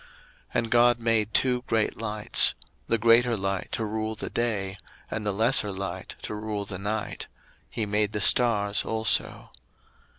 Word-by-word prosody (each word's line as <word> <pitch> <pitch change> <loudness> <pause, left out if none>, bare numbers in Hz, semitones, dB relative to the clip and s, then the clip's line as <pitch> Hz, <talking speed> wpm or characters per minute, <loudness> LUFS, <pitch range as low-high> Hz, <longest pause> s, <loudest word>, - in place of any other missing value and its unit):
01:001:016 - - -22 0.5
And 115 -1 -1
God 120 0 +4
made 115 -2 +1
two 125 -1 +2
great 110 -1 0
lights; 105 -1 +1 0.3
the 115 - +1
greater 115 +1 +4
light 95 -1 -3
to 110 - -1
rule 110 +1 -3
the - - -6
day, 105 -5 -2 0.3
and 110 - -3
the 105 - -1
lesser 110 +1 +3
light 95 -2 -6
to - - -5
rule 105 -1 -4
the 95 -2 -7
night: 105 +2 -4 0.4
he 110 - -3
made 105 0 0
the 105 - -3
stars 105 -2 +4
also. 110 -1 0
110 Hz, 160 wpm, -26 LUFS, 105-115 Hz, 0.5 s, God